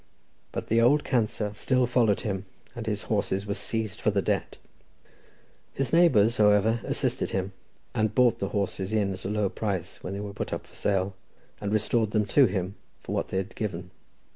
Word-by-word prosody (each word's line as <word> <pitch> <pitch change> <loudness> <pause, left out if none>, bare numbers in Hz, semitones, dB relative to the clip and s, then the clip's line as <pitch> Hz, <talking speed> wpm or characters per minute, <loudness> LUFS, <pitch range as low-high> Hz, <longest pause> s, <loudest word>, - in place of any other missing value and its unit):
But - - -4
the 115 +1 +4
"old 145 +6 +4
cancer" 110 -3 0
still 125 +4 +2
followed 120 -4 +2
him, 100 -3 -3 0.3
and 115 -2 -6
his 105 -1 -2
horses 100 -2 -1
were 100 - -1
seized 110 -1 -2
for - - +3
the 100 -1 +1
debt. - - -1 1.2
His 135 +2 -1
neighbours, 120 -10 +5
however, 105 +2 +4
assisted - - 0
him, 95 0 -2 0.4
and 110 -1 0
bought 125 -3 +4
the 100 - -1
horses 100 -1 -2
in 105 -3 +1
at 95 0 -9
a - - -1
low 105 -1 +1
price 95 -3 -3
when 95 - -4
they 100 - -4
were 100 -1 -5
put - - -4
up - - -4
for - - -22
sale, 100 -1 0 0.5
and 100 -1 -2
restored 110 0 +1
them 105 -1 +2
to 135 +5 +5
him, 95 -1 -2 0.3
for - - -4
what - - -1
they - - -3
had 95 +3 -3
given. 90 -4 -4
105 Hz, 190 wpm, -27 LUFS, 100-115 Hz, 1.2 s, neighbours